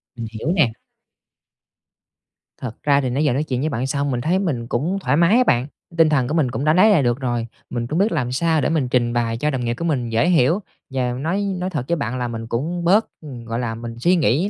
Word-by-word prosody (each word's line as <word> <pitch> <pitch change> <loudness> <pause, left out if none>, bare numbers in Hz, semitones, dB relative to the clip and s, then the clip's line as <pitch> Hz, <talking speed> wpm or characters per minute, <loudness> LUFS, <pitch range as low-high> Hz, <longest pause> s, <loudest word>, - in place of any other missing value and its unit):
Mình 115 -2 -5
hiểu 115 +9 -2
nè. 135 -10 +3 1.9
Thật 120 -4 -7
ra 140 -1 +3
thì 130 - -1
nãy 140 +5 0
giờ 145 - +2
nói 145 +4 0
chuyện 130 -5 -2
với 155 +3 0
bạn 130 -1 -2
xong 140 0 -1
mình 120 -1 -1
thấy 175 +7 +1
mình 135 -12 -2
cũng 160 +12 -1
thoải 150 - +1
mái 170 +8 +5
á 255 - +5
bạn, 125 - +2 0.3
tinh 160 -1 +5
thần 135 -5 +2
của 150 - -3
mình 150 -7 +1
cũng 125 +5 -3
đã 155 - +4
lấy 185 +5 +6
lại 170 -9 +4
được 120 +1 +1
rồi, 120 -3 -2 0.2
mình 120 -1 -3
cũng 160 +6 -1
biết 210 +3 +2
làm 125 -1 -1
sao 160 +2 +1
để - - +1
mình 155 -6 +1
trình 120 -1 +1
bày 115 -1 0
cho 150 +5 0
đồng 130 -4 -2
nghiệp 120 - 0
của 165 +7 -5
mình 125 -7 -1
dễ 115 +8 +2
hiểu. 165 +2 +3 0.3
Và 130 -2 -1
nói 160 +10 -1 0.2
nói 185 +1 -2
thật 145 -8 -3
với 170 - +1
bạn 125 -4 -3
là 125 - -1
mình 115 -1 -6
cũng 165 +10 -2
bớt 200 +6 +4 0.4
gọi 115 +1 -3
là, 115 -2 -2
mình 115 0 -7
suy 175 +8 +3
nghĩ 160 - +2
135 Hz, 255 wpm, -21 LUFS, 120-165 Hz, 1.9 s, lấy